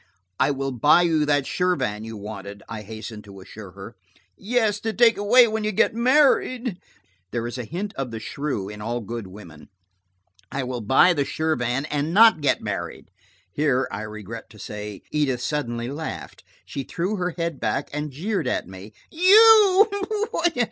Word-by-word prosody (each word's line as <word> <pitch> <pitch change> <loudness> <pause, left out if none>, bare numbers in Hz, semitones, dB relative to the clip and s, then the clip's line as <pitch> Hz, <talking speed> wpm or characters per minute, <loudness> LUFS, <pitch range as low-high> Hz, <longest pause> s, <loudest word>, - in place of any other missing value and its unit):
"I - - +3
will 135 -1 -2
buy 145 +8 +4
you 160 -3 +1
that 145 -2 +2
Shirvan 175 - -1
you 110 -1 -7
wanted," 100 -1 -8
I 110 -2 -6
hastened 110 0 -9
to 100 -1 -12
assure 95 0 -11
her. 100 +4 -11 0.4
"Yes, 215 -1 0
to 225 +1 -3
take 230 0 +5
away 235 +5 +5
when 220 0 -2
you 215 - 0
get 200 - +2
married." 255 -3 +2 0.5
There 120 +2 -3
is 120 +2 -5
a 120 - -4
hint 195 - -5
of 135 -2 -4
the 115 -1 -6
shrew 130 -3 -4
in 105 +1 -9
all 120 +3 -3
good 115 -1 -6
women. 90 -6 -13 0.8
"I 140 - -2
will 125 -1 -4
buy 135 - +4
the 145 -4 0
Shirvan 140 -4 -1
and 150 +4 -1
not 220 -6 +6
get 145 - +1
married." - - -5 0.4
Here, 135 -1 +1
I 100 - -5
regret 110 +1 -8
to 110 - -16
say, 105 -1 -8
Edith 140 -5 0
suddenly 120 -6 -3
laughed. 135 - -7 0.2
She 140 - -5
threw 180 +10 -3
her 180 -2 -3
head 170 -4 -3
back 140 - -2
and 150 +1 -3
jeered 165 +3 -3
at 125 - -2
me. 95 +3 -11 0.2
"You!" 410 +2 +7
140 Hz, 170 wpm, -23 LUFS, 110-185 Hz, 0.8 s, You